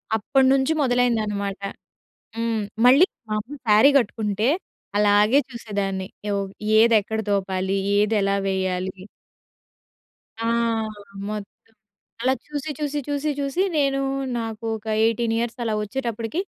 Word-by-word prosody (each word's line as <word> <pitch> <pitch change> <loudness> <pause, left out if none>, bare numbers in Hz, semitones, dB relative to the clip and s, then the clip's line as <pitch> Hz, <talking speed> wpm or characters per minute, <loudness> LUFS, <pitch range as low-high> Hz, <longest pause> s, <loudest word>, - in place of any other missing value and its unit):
అప్పటినుంచి 265 +5 +3
మొదలైందన్నమాట. 220 -6 0 0.8
హ్మ్. 230 -1 -1 0.2
మళ్ళీ 275 +9 +7 0.2
మాములు 215 +7 -3
శారీ 215 +7 +7
కట్టుకుంటే 215 -2 -1 0.5
అలాగే 210 +4 +5
చూసేదాన్ని. 200 -6 -3 0.2
యోగ్ 200 -1 -2 0.3
ఏదెక్కడ 220 -1 +3
తోపాలి? 190 -1 0 0.2
ఏదెలా 205 -2 +2
వేయాలి? 190 0 -2 1.4
ఆ! - - -2 0.9
మొత్తం. 210 -2 -5 0.7
అలా 260 +2 +3
చూసి, 300 0 -4
చూసి, 295 -1 -1
చూసి, 290 +1 -1
చూసి 280 +6 0
నేను 275 -2 +2 0.4
నాకు 225 -1 -5
ఒక 220 +1 -15 0.2
18 230 0 +1
ఇయర్స్ 235 0 -2
అలా 220 - 0
వచ్చేటప్పటికి 230 - -3
225 Hz, 100 wpm, -23 LUFS, 205-260 Hz, 1.4 s, మళ్ళీ